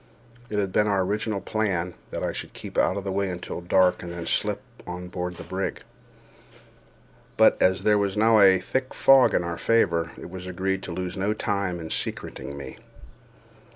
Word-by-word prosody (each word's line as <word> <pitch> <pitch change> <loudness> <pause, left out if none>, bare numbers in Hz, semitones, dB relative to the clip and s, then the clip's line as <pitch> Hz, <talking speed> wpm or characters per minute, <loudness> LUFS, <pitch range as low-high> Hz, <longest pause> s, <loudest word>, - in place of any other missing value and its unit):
It 105 - -3
had 100 -2 0
been 105 +3 +2
our 100 -2 +2
original 105 +1 -2
plan 95 -4 -1 0.2
that - - -4
I - - 0
should - - -6
keep - - -9
out 95 - +2
of 100 - -4
the 95 - -3
way 100 0 0
until 90 -1 -5
dark, 90 +1 +3
and 85 - -7
then 85 -1 -6
slip - - -1 0.2
on 90 0 -6
board 90 0 -4
the - - -9
brig; 95 +1 -4 1.5
but, - - +6
as 95 +1 +3
there 105 -1 +4
was 100 0 -1
now 110 +1 +5
a 95 -2 +7
thick 130 +7 -3
fog 135 -1 +6
in - - +2
our 85 -1 -4
favor, 85 -8 +2
it - - -9
was 90 0 -7
agreed 95 +1 -2
to - - -6
lose 90 +1 -4
no 100 +2 0
time 100 -4 -2
in 80 -1 -7
secreting 70 - -4
me. 65 -2 -8
95 Hz, 190 wpm, -25 LUFS, 90-100 Hz, 1.5 s, a